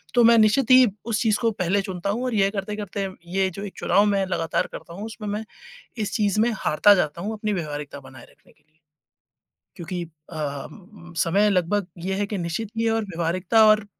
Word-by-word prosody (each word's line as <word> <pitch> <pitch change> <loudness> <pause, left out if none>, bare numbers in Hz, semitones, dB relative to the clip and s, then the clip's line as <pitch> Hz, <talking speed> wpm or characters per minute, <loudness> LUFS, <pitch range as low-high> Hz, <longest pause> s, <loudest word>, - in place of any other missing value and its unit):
तो 240 - +6
मैं 230 0 +7
निश्चित 220 +4 +3
ही 255 0 +9 0.2
उस 225 -3 -1
चीज़ 215 -2 +2
को 230 - +3
पहले 195 0 0
चुनता 190 0 -4
हूँ 230 +5 -1
और 250 - -2
ये 195 -1 +3
करते-करते 200 -1 -4 0.3
ये 190 -1 +2
जो 200 - -7
एक 200 - -7
चुनाव 205 +1 +3
मैं 200 -2 +1
लगातार 165 -3 -1
करता 170 - -9
हूँ, 205 +4 -6
उसमें 220 -1 -7
मैं 210 +2 -3 0.6
इस 210 - -3
चीज़ 210 -2 +1
में 240 +2 +3
हारता 205 +6 +4
जाता 170 -2 -1
हूँ 215 +3 -3
अपनी 215 -1 -2
व्यावहारिकता 150 -5 -5
बनाए 130 -2 -14
रखने - - -25
के - - -35
लिए। 155 +1 -39 1.0
क्योंकि 175 +1 -5
अ, 150 -3 -6 0.6
समय 200 +5 +3
लगभग 190 +1 +1 0.2
ये 190 0 -1
है 205 - 0
कि 205 - -3
निश्चित 175 +6 -3
ही 230 0 +1
और 225 0 +1
व्यावहारिकता 180 +5 +2
और 215 -1 +4
200 Hz, 200 wpm, -24 LUFS, 170-215 Hz, 1.0 s, ही